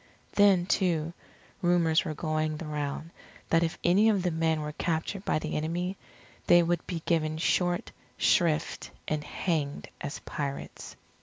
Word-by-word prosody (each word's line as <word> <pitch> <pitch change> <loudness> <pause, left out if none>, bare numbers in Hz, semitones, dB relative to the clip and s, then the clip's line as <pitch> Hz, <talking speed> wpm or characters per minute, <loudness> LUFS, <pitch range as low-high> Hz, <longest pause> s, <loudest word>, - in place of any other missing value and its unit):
Then, 195 -4 +5
too, 170 -4 +1 0.5
rumours 170 -2 +3
were 155 - -3
going 155 0 -1
the 165 - -6
round, 150 +1 -4 0.4
that 165 - +4
if 165 -1 -1
any 200 +6 +5
of 200 -4 +2
the 180 - +1
men 160 -1 +1
were 150 0 -4
captured 170 +5 -2
by - - +2
the - - -3
enemy, 175 +5 -1 0.5
they 175 0 +7
would 170 +1 -1
be 165 -3 -4
given 155 -2 +1
short 175 +2 +1 0.3
shrift 165 -3 +2 0.2
and 155 -1 -1
hanged 150 -4 -2
as 145 - -4
pirates. 140 -2 -6
165 Hz, 150 wpm, -29 LUFS, 155-175 Hz, 0.5 s, they